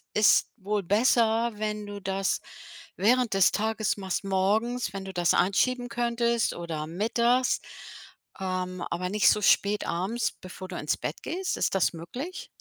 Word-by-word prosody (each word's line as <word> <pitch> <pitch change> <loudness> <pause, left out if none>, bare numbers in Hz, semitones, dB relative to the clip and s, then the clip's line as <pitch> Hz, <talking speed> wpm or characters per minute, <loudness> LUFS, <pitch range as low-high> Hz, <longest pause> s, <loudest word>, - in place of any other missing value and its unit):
ist 210 0 +5
wohl 205 0 -1
besser, 225 +3 +3
wenn 210 0 -3
du 205 0 -7
das 195 0 -1 0.5
während 235 +2 +2
des 195 -2 +5
Tages 220 0 -1
machst, 190 -1 -3
morgens, 205 +4 0
wenn 195 0 -6
du 190 - -7
das 175 -2 +2
einschieben 245 +7 +2
könntest 235 -1 0
oder 160 -3 -5
mittags, 235 +8 +1 0.8
ähm, 185 -1 -3
aber 180 +1 -2
nicht 210 +1 +4
so 210 - +3
spät 205 +1 +3
abends, 195 +8 -1
bevor 185 0 -9
du 180 -2 -6
ins 150 - -1
Bett 150 - -5
gehst. 370 +4 -3
Ist - - 0
das 185 -2 +2
möglich? 250 - -7
205 Hz, 150 wpm, -27 LUFS, 185-235 Hz, 0.8 s, ist